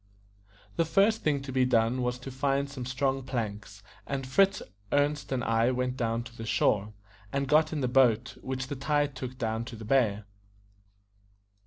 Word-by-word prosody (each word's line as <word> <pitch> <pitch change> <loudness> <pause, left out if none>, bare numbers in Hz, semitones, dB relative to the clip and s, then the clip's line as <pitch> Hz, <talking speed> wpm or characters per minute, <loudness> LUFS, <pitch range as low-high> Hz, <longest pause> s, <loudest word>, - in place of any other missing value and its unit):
The - - +4
first 200 +6 +3
thing 145 -3 0
to 135 - -6
be 130 0 +2
done 120 0 +2
was 125 0 -1
to 135 - -7
find 140 +2 0
some 130 -3 -7
strong 135 +1 0
planks; 105 -6 -5 0.2
and 135 -1 -3
Fritz, 195 +9 +3 0.3
Ernest, 145 -1 +1
and 130 -2 0
I 115 +1 +2
went 125 0 -1
down 115 -2 -1
to 115 0 -12
the 115 - -7
shore, 105 -1 +1 0.4
and 140 0 -1
got 155 +2 +4
in 155 -2 -2
the 130 - +1
boat, 125 -2 +3
which 130 -1 -3
the 145 - -5
tide 145 +1 0
took 130 0 -6
down 110 -1 -2
to 120 - -8
the 110 0 -9
bay. 110 -4 +2
130 Hz, 180 wpm, -29 LUFS, 115-140 Hz, 0.4 s, The